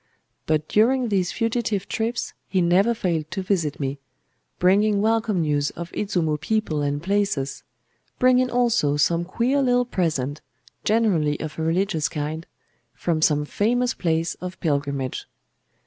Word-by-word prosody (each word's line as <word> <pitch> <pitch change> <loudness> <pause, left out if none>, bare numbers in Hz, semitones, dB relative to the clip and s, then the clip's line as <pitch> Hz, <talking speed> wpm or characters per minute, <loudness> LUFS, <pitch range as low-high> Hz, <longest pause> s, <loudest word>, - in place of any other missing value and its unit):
But 155 -1 +1
during 245 +3 +3
these 185 -4 +1
fugitive 225 -4 -1
trips 230 +1 -2 0.2
he 190 - +1
never 185 +7 +3
failed 165 -7 -1
to 190 - -4
visit 170 -7 -1
me; 140 0 -3 0.6
bringing 200 +3 +3
welcome 220 -3 +1
news 145 -2 +1
of 170 +1 -8
Izumo 170 -7 -1
people 190 -5 0
and 145 0 -2
places,—bringing 200 - -1
also 235 -13 +2
some 170 +4 +2
queer 240 +10 0
little 245 -1 +2
present, 155 - -1 0.4
generally 190 -10 +2
of 155 0 -6
a - - -1
religious 165 0 0
kind, 155 +2 -4 0.5
from 155 +5 -1
some 150 -2 +3
famous 245 +9 +1
place 165 -1 0
of 180 0 -6
pilgrimage. 140 -4 -2
180 Hz, 130 wpm, -23 LUFS, 150-220 Hz, 0.6 s, during